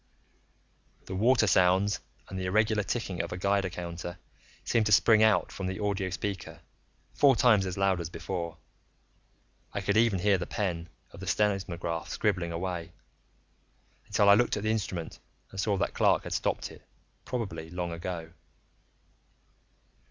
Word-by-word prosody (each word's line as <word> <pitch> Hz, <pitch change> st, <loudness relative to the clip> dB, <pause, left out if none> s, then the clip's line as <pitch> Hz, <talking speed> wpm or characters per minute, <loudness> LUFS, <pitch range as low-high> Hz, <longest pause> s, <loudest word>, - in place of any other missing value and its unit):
The -, -, -6 dB
water 115 Hz, +5 st, +4 dB
sounds 95 Hz, +2 st, +3 dB, 0.3 s
and 95 Hz, -, -5 dB
the 95 Hz, -, -3 dB
irregular 110 Hz, +2 st, +2 dB
ticking 100 Hz, -3 st, -2 dB
of -, -, -6 dB
a 90 Hz, -, -4 dB
Geiger 100 Hz, 0 st, +1 dB
counter 85 Hz, 0 st, -6 dB, 0.5 s
seemed 110 Hz, -2 st, +1 dB
to -, -, 0 dB
spring 110 Hz, +2 st, +6 dB
out 110 Hz, 0 st, +4 dB
from 95 Hz, -, -4 dB
the 95 Hz, -, -3 dB
audio 100 Hz, -2 st, -1 dB
speaker, 95 Hz, +1 st, -5 dB, 0.5 s
four 140 Hz, -3 st, +5 dB
times 105 Hz, -5 st, +4 dB
as 90 Hz, -, -4 dB
loud 95 Hz, -2 st, +2 dB
as 80 Hz, -, -5 dB
before. 85 Hz, 0 st, -5 dB, 1.2 s
I -, -, -1 dB
could 100 Hz, +1 st, +1 dB
even 115 Hz, -3 st, +4 dB
hear 100 Hz, +1 st, +3 dB
the 85 Hz, -, -4 dB
pen 85 Hz, -5 st, -2 dB, 0.2 s
of -, -, -12 dB
the 95 Hz, -, -7 dB
seismograph 95 Hz, -5 st, -1 dB
scribbling 95 Hz, -5 st, 0 dB
away, 85 Hz, -1 st, -4 dB, 1.1 s
until 100 Hz, -, +2 dB
I 100 Hz, -, +9 dB
looked 120 Hz, +1 st, +3 dB
at 105 Hz, -, -4 dB
the 110 Hz, -, +1 dB
instrument 95 Hz, -6 st, -3 dB, 0.3 s
and 100 Hz, -, -7 dB
saw 100 Hz, 0 st, +1 dB
that -, -, -1 dB
Clark -, -, +3 dB
had -, -, -5 dB
stopped -, -, -1 dB
it, -, -, -14 dB, 0.4 s
probably 90 Hz, -10 st, -4 dB
long 90 Hz, 0 st, -3 dB
ago. 85 Hz, -1 st, -5 dB
95 Hz, 155 wpm, -29 LUFS, 85-105 Hz, 1.2 s, I